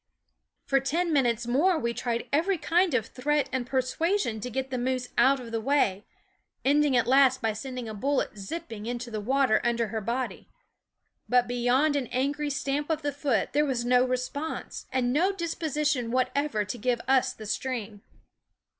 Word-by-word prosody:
For 275 -1 +3
ten 325 +5 0
minutes 240 -4 +2
more 310 +9 +3
we 235 -4 -1
tried 235 -1 -2
every 350 +6 +2
kind 335 0 +2
of 225 -4 +1
threat 285 +3 0
and 255 -2 -2
persuasion 260 - 0
to 250 - -5
get 265 +2 -3
the 255 - -1
moose 255 0 -1
out 275 +1 +4
of 235 -2 -9
the 225 -1 -2
way, 220 -7 +1 0.6
ending 285 -1 +4
at 240 - +3
last 260 0 +5
by 225 -3 0
sending 250 +2 -6
a 220 - -5
bullet 270 +5 -1
zipping 220 - -6
into 240 0 -4
the 215 -1 -3
water 260 +1 +2
under 235 -2 0
her 220 0 -3
body; 240 +4 -3 0.8
but 245 -1 +4
beyond 245 +5 +2
an 270 -4 -1
angry 285 +4 -1
stamp 285 +1 -2
of 315 -1 -1
the 290 -1 -1
foot 270 -8 0
there 295 +2 +3
was 255 -5 -1
no 250 0 +4
response, 255 +5 -4
and 250 -1 +1
no 355 +7 +3
disposi 320 -5 -1
tion 245 -5 -1
whatever 255 -2 0
to 235 +5 -5
give 245 +1 0
us 265 -1 +3
the 215 - -10
stream. 215 -2 -3
260 Hz, 180 wpm, -27 LUFS, 235-290 Hz, 0.8 s, last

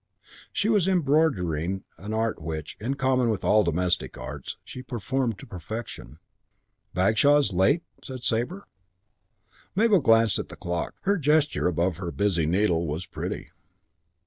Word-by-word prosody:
She 205 - 0
was 205 -5 +3
embroidering, 100 - +1 0.2
an 105 +2 -6
art 110 -3 -1
which, 80 -1 -5
in 125 +6 -2
common 130 -3 +2
with 110 -4 -1
all 105 0 +4
the 85 - +1
domestic 90 +1 0
arts, 65 +1 -7
she 130 - -8
performed 125 -2 -2
to - - -11
perfection. 90 - -7 0.8
"Bagshaw's 110 +7 +4
late?" 95 - +3 0.2
said 130 -2 -7
Sabre. 125 - -1 1.1
Mabel 210 -1 +5
glanced 115 -5 +4
at - - -5
the - - -9
clock. 85 -1 -3
Her 200 +1 +2
gesture 150 - +2
above 85 0 0
her 90 -2 -4
busy 90 -6 +1
needle 85 -2 +2
was 80 +4 -3
pretty. - - -5
110 Hz, 145 wpm, -26 LUFS, 85-140 Hz, 1.1 s, Mabel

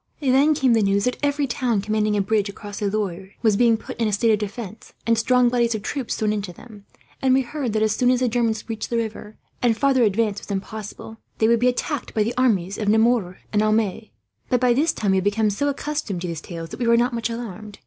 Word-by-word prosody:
Then 280 +2 +3
came 265 -5 +3
the 225 - +3
news 200 0 +2
that 250 - -1
every 285 0 +1
town 240 -3 0
commanding 210 +1 0
a - - +2
bridge 205 0 0
across 205 0 -8
the 205 - 0
Loire 195 -2 -4
was 215 -3 +4
being 230 +1 +4
put - - -9
in 225 - +3
a - - 0
state 225 +3 +2
of 210 - +2
defence, 215 0 -7
and 230 - +3
strong 250 +2 +3
bodies 235 -1 +1
of 210 - -5
troops 265 -1 -3
thrown 215 -1 0
into 205 -3 -4
them; 205 +2 -14 0.4
and 260 -1 +4
we 270 - +4
heard 260 -2 -4
that, 215 0 +1
as 215 0 +1
soon 250 - +2
as 250 -1 +3
the 255 - +1
Germans 225 -2 0
reached 220 -2 -4
the 235 - 0
river, 220 -1 -5 0.2
and 235 -3 +2
farther 275 -1 +3
advance 210 -1 +1
was - - -14
impossible, 210 +2 -6 0.2
they 220 - +3
would 235 0 +4
be 250 - +3
attacked 285 +3 -3
by 215 - +3
the 230 +3 -2
armies 200 -7 +1
of 210 -2 0
Nemours 220 -4 +2 0.2
and 210 - +3
Aumale. 215 0 0 0.4
But 250 - +2
by 250 -1 +3
this 305 +6 +2
time 205 -9 -1
we 190 - +3
had 190 - 0
become 210 +1 +1
so 285 +8 -1
accustomed 280 - -3
to 180 - -3
these 165 -2 -5
tales 165 -2 -7
that - - -9
we 240 - 0
were 235 0 +5
not 245 +1 +1
much 230 0 -2
alarmed. 215 -3 -7
220 Hz, 250 wpm, -23 LUFS, 205-245 Hz, 0.4 s, were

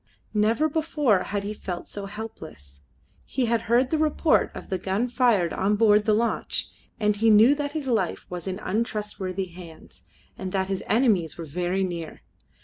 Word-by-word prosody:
Never 225 +8 +2
before 295 - +1
had 200 0 -3
he 205 +1 -3
felt 180 -4 -6
so 200 -1 -6
helpless. 160 - -10 0.4
He 260 - -1
had 230 0 +1
heard 245 +2 +3
the 315 - +1
report 310 0 +2
of - - -9
the 190 - -1
gun 195 +7 -1
fired 235 -9 +2
on 200 +2 +1
board 210 -1 +4
the 215 - +3
launch, 235 +2 -1 0.3
and 210 -1 +2
he 225 +2 +3
knew 220 +5 +7
that 290 0 -3
his 310 -3 -3
life 220 -9 -1
was 180 -1 -7
in 185 0 -2
untrustworthy 205 -3 -2
hands, 170 -2 -13 0.4
and 185 - -4
that 190 -1 0
his 195 -1 -2
enemies 210 - +2
were 165 - -6
very 180 +5 -1
near. 170 -3 -5
210 Hz, 175 wpm, -25 LUFS, 185-235 Hz, 0.4 s, knew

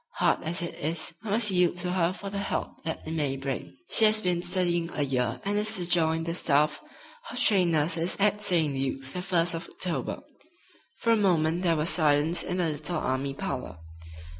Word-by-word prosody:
Hard - - +1
as 170 +2 0
it 170 - -4
is, 160 +2 -1
I 220 - -6
must 210 0 +3
yield 180 -2 +2
to 180 0 -3
her 180 -2 +1
for 195 +1 -7
the 200 - -3
help 200 - -4
that 160 - -4
it - - -4
may 145 -4 -2
bring. 130 -10 -6
She 220 - +5
has 215 0 +6
been 180 -4 -1
studying 175 -2 0
a 145 - +1
year 125 -3 -1
and 205 +1 0
is 215 +1 0
to 175 -2 -1
join 165 -2 +2
the 165 0 -3
staff 150 -3 +1 0.5
of - - -4
trained 190 -8 +4
nurses 165 +3 +1
at 210 +1 +2
St. 165 -7 +3
Luke's 135 0 -2
the 180 - -3
first 175 -2 +1
of 165 - -5
October." 165 -9 -3 0.7
For 230 - 0
a - - +5
moment 175 -5 +1
there 170 -3 +2
was 155 +1 0
silence 155 +1 +3
in 180 - -3
the 175 -3 +1
little 155 +3 -2
army 135 -1 -2
parlor. 130 - -5
170 Hz, 205 wpm, -27 LUFS, 150-185 Hz, 0.7 s, has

